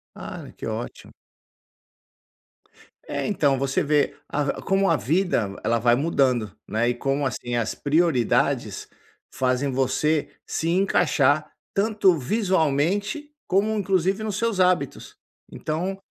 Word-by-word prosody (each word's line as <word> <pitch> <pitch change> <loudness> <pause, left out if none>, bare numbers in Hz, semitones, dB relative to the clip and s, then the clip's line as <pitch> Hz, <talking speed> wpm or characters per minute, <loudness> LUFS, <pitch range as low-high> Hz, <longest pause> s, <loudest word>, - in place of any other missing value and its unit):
Ah, - - -8
que - - -6
ótimo. - - -6 1.9
É - - -3
então, 145 -10 +2
você 140 +7 0
vê 145 0 +1
a 145 -1 -1
como 195 0 +2
a 165 - +4
vida, 140 - 0
ela 115 0 +1
vai 120 +1 +4
mudando 130 - +1 0.2
né, 115 +2 +1
e 125 - +1
como, 135 +3 -1
assim, 120 -2 -3
as 115 -2 -1
prioridades 150 -5 +1 0.5
fazem 130 +2 0
você 135 +4 +1 0.2
se 165 - -2
encaixar, 155 -5 +2 0.2
tanto 200 -4 +3
visualmente 190 - 0 0.2
como, 205 +4 +2
inclusive, 195 +1 +1
nos 210 -2 -2
seus 230 -4 -1
hábitos. 180 -7 0 0.3
Então, 180 +5 -3
155 Hz, 120 wpm, -24 LUFS, 135-190 Hz, 1.9 s, a